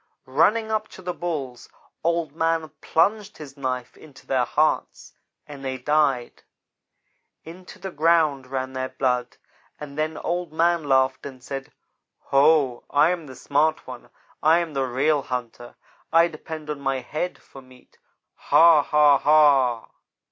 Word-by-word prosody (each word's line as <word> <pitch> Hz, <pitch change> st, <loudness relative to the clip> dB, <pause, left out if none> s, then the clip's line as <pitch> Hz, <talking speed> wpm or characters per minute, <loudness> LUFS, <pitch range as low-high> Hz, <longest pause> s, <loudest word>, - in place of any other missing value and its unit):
"Running 205 Hz, +12 st, +2 dB
up 215 Hz, 0 st, -1 dB
to 190 Hz, -, -13 dB
the 180 Hz, 0 st, -3 dB
Bulls, 140 Hz, -9 st, -5 dB, 0.3 s
Old 165 Hz, -3 st, -1 dB
man 165 Hz, -1 st, 0 dB
plunged 205 Hz, +5 st, 0 dB
his 140 Hz, -3 st, -11 dB
knife 130 Hz, -3 st, -4 dB
into 145 Hz, -4 st, -17 dB
their 130 Hz, -2 st, +1 dB
hearts, 155 Hz, +5 st, -1 dB, 0.3 s
and 140 Hz, -2 st, -10 dB
they 130 Hz, -1 st, -3 dB
died. 135 Hz, -2 st, 0 dB, 1.0 s
Into 180 Hz, +5 st, -12 dB
the 190 Hz, -1 st, -7 dB
ground 155 Hz, -4 st, +2 dB
ran 130 Hz, 0 st, -4 dB
their 130 Hz, 0 st, -3 dB
blood, 125 Hz, -2 st, -2 dB, 0.4 s
and 150 Hz, 0 st, -8 dB
then 155 Hz, 0 st, -2 dB
Old 175 Hz, -2 st, -3 dB
man 170 Hz, 0 st, +1 dB
laughed 130 Hz, -1 st, +1 dB
and 130 Hz, -2 st, -12 dB
said: 135 Hz, 0 st, -7 dB, 0.6 s
'Ho, 140 Hz, -3 st, +3 dB
I 150 Hz, +4 st, +3 dB
am 170 Hz, -4 st, -4 dB
the 130 Hz, -, -11 dB
smart 150 Hz, +5 st, 0 dB
one. 125 Hz, -2 st, -10 dB, 0.3 s
I 160 Hz, +2 st, +5 dB
am 170 Hz, -3 st, -3 dB
the 135 Hz, -1 st, -1 dB
real 140 Hz, +4 st, +1 dB
hunter. 120 Hz, -2 st, -6 dB, 0.4 s
I 165 Hz, +1 st, +5 dB
depend 155 Hz, -1 st, -8 dB
on 150 Hz, -, -5 dB
my 135 Hz, -1 st, -2 dB
head 155 Hz, +8 st, -4 dB
for 135 Hz, -, -15 dB
meat 130 Hz, -1 st, -21 dB, 0.3 s
ha! 165 Hz, -2 st, +5 dB
ha! 145 Hz, -1 st, +4 dB
ha!' 140 Hz, -6 st, +3 dB
150 Hz, 150 wpm, -23 LUFS, 130-165 Hz, 1.0 s, I